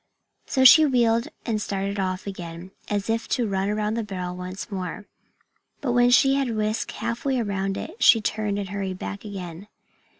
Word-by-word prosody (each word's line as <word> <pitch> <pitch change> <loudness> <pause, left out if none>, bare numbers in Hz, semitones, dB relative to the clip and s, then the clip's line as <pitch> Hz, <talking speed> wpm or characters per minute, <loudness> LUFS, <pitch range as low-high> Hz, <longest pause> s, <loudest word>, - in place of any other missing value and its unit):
So 260 - +2
she 310 +5 +9
wheeled 235 -4 +2 0.2
and 220 -3 -1
started 200 0 -3
off 185 -1 -2
again, 175 -2 -7 0.2
as 205 -1 -1
if 225 +1 -1
to 240 -3 0
run 195 0 -1
around 210 0 -1
the 230 - -1
barrel 180 -3 -5
once 185 +4 -7
more. 190 +2 -5 0.7
But 270 -4 -1
when 245 0 +4
she 270 +2 +5
had 270 -4 0
whisked 215 +1 -1
half 230 +1 -4
way 270 -2 +1
around 195 -3 -2
it 240 - -7
she 240 -2 +7
turned 210 -1 -2
and 200 -2 -4
hurried 190 -1 -3
back 200 +1 -6
again. 190 -3 -7
210 Hz, 180 wpm, -24 LUFS, 190-230 Hz, 0.7 s, she